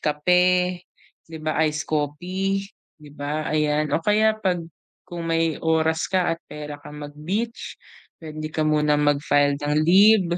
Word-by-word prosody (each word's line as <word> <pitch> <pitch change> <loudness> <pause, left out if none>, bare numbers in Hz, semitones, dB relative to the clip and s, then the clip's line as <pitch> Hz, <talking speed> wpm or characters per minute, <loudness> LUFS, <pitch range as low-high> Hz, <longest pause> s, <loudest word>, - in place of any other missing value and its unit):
kape, 180 +4 +2 0.5
di 160 - -8
ba 155 0 -1
ice 150 0 -2
coffee, 180 +6 -2 0.3
di 150 -1 -15
ba 150 +2 -4
ayan. 150 -1 +1
O - - +3
kaya 215 +4 +2
'pag 180 -5 -1 0.5
kung 175 -2 -6
may 165 -1 +1
oras 160 0 +1
ka 185 -3 +1
at - - -30
pera 150 -1 -7
kang 150 +1 -10
mag-beach, 185 +11 -4 0.5
puwede 155 -1 -6
ka 155 - -1
muna 150 -1 +2
mag-file 145 -1 +2
ng 145 0 -1
leave, 200 +4 +6
155 Hz, 145 wpm, -23 LUFS, 150-180 Hz, 0.5 s, leave